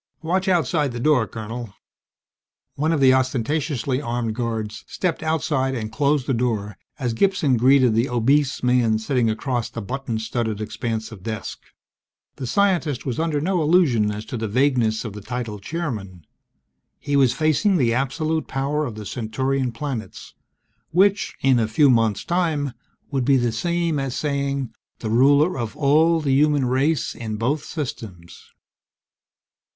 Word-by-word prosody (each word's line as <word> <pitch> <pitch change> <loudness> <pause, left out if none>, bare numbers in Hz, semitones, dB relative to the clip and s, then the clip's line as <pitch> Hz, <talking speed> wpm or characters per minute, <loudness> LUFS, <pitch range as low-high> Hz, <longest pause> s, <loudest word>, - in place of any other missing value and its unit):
Watch 185 +4 0
outside 155 -6 +1
the 120 - -4
door, 125 -4 +3
Colonel!" 110 +1 -7 1.0
One 155 +3 0
of 155 -4 +1
the 130 -1 +6
ostentatiously 130 +1 0
armed 120 -3 -2
guards 110 -2 -4
stepped 180 -3 -2
outside 150 -4 0
and 110 -3 -4
closed 140 +3 +1
the 135 - 0
door 110 -4 -1 0.2
as 125 -4 -2
Gibson 160 -2 +2
greeted 130 0 +4
the 115 +4 +1
obese 130 +4 +1
man 125 -3 +3
sitting 115 +1 0
across 120 +1 -2
the - - -6
button 125 +1 -4
studded 110 -1 -2
expanse 110 +1 -4
of 105 -4 -10
desk. 110 -5 -5 0.8
The 130 - -5
scientist 170 -6 +1
was 130 -1 -2
under 160 -2 0
no 180 +3 0
illusion 150 - +3
as 105 +1 -5
to 120 - -5
the 110 0 -2
vagueness 120 -1 +1
of 110 - -5
the 105 - -8
title 115 -2 -5
"Chairman." 100 - -5 0.7
He 145 - -2
was 130 -3 +4
facing 155 +7 +2
the 120 -6 +2
absolute 155 +5 -1
power 140 +3 -1
of 115 - -7
the 105 -1 -8
Centaurian 130 +4 -2
planets 120 -2 -6 0.6
which, 195 +4 +2
in 130 -2 +4
a 110 - +1
few 135 +5 +4
months' 115 -4 +1
time, 160 -6 0 0.4
would 135 -3 0
be 135 +2 +4
the 120 -2 +1
same 170 +5 -1
as 135 -2 -3
saying 140 -4 -2 0.2
the 110 - -4
ruler 140 +6 +4
of 115 -3 -4
all 155 +3 +4
the 140 -3 +1
human 145 -1 +3
race 135 +5 +1
in 110 -2 -5
both 135 +7 -1
systems. 110 - -7
130 Hz, 155 wpm, -22 LUFS, 115-150 Hz, 1.0 s, the